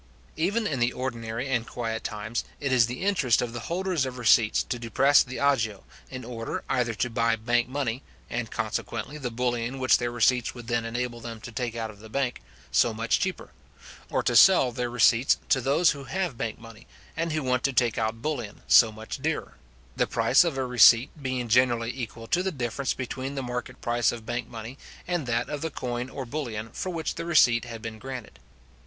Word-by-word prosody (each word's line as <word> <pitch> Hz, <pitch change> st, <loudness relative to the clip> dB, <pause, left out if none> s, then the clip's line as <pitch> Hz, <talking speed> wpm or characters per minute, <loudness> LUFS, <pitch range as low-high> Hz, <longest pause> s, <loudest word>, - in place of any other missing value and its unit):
Even 200 Hz, +8 st, 0 dB
in 125 Hz, -8 st, +1 dB
ordinary 120 Hz, -1 st, -4 dB
and 120 Hz, -4 st, -1 dB
quiet 115 Hz, -2 st, -4 dB
times, 110 Hz, +2 st, -3 dB, 0.2 s
it 140 Hz, -3 st, -2 dB
is 120 Hz, -3 st, +5 dB
the 125 Hz, +7 st, -5 dB
interest 165 Hz, -, +2 dB
of 120 Hz, -1 st, -2 dB
the 120 Hz, -, -4 dB
holders 180 Hz, -3 st, 0 dB
of 130 Hz, -1 st, -4 dB
receipts 115 Hz, -2 st, +4 dB
to 120 Hz, -, -4 dB
depress 135 Hz, +5 st, +4 dB
the 130 Hz, 0 st, -4 dB
agio, 115 Hz, -8 st, +1 dB, 0.3 s
in 125 Hz, -2 st, -7 dB
order 115 Hz, -2 st, -5 dB
either 120 Hz, -3 st, 0 dB
to 115 Hz, -, 0 dB
buy 115 Hz, -1 st, +1 dB
bank 120 Hz, +2 st, 0 dB
money 130 Hz, -2 st, -2 dB, 0.3 s
(and 115 Hz, -2 st, -3 dB
consequently 110 Hz, +5 st, -4 dB
the 130 Hz, -4 st, -3 dB
bullion 120 Hz, +1 st, -2 dB
which 130 Hz, -1 st, +4 dB
their 120 Hz, -1 st, -1 dB
receipts 120 Hz, +1 st, +2 dB
would 120 Hz, -1 st, -9 dB
then 120 Hz, -1 st, -1 dB
enable 120 Hz, +1 st, -3 dB
them 115 Hz, -1 st, -7 dB
to 120 Hz, -, -8 dB
take 120 Hz, -1 st, -3 dB
out 115 Hz, -1 st, -3 dB
of 105 Hz, -, -17 dB
the 110 Hz, +1 st, -12 dB
bank 130 Hz, +1 st, -2 dB, 0.2 s
) -, -, -25 dB
so 110 Hz, -, +3 dB
much 115 Hz, 0 st, +1 dB
cheaper, 185 Hz, -1 st, -3 dB, 0.6 s
or -, -, 0 dB
to -, -, +1 dB
sell 170 Hz, -10 st, +7 dB
their 120 Hz, 0 st, -3 dB
receipts 120 Hz, +1 st, +4 dB
to 130 Hz, -, +3 dB
those 145 Hz, +7 st, +3 dB
who 140 Hz, -2 st, -7 dB
have 185 Hz, -6 st, -2 dB
bank 115 Hz, -1 st, -3 dB
money, 115 Hz, -1 st, -14 dB, 0.3 s
and 165 Hz, 0 st, -1 dB
who 155 Hz, -1 st, -1 dB
want 125 Hz, -1 st, +1 dB
to 140 Hz, -, +2 dB
take 120 Hz, -3 st, +1 dB
out 115 Hz, +1 st, -2 dB
bullion, 120 Hz, -9 st, -4 dB
so 115 Hz, -2 st, +7 dB
much 110 Hz, +5 st, -7 dB
dearer; 160 Hz, +1 st, -2 dB, 0.4 s
the -, -, +1 dB
price -, -, +4 dB
of 165 Hz, -6 st, -2 dB
a 130 Hz, -, 0 dB
receipt 125 Hz, +1 st, +6 dB
being 130 Hz, -2 st, -2 dB
generally 120 Hz, 0 st, +2 dB
equal 115 Hz, -3 st, -6 dB
to 175 Hz, +10 st, +1 dB
the 190 Hz, +1 st, -1 dB
difference 130 Hz, -2 st, -2 dB
between 130 Hz, +2 st, -5 dB
the 135 Hz, -, -3 dB
market 125 Hz, 0 st, -5 dB
price 120 Hz, 0 st, +1 dB
of 115 Hz, -2 st, -8 dB
bank 120 Hz, +2 st, -3 dB
money 115 Hz, +4 st, -8 dB, 0.3 s
and 175 Hz, -6 st, -1 dB
that 120 Hz, 0 st, 0 dB
of 145 Hz, -1 st, -4 dB
the 160 Hz, -, -2 dB
coin 125 Hz, -3 st, -4 dB
or 135 Hz, 0 st, -6 dB
bullion 115 Hz, -5 st, -4 dB
for 185 Hz, -, -4 dB
which 165 Hz, -3 st, -3 dB
the 165 Hz, -, -5 dB
receipt 125 Hz, -8 st, +4 dB
had 115 Hz, -1 st, -8 dB
been 110 Hz, -1 st, -6 dB
granted. 125 Hz, -, -8 dB
120 Hz, 210 wpm, -27 LUFS, 115-135 Hz, 0.6 s, sell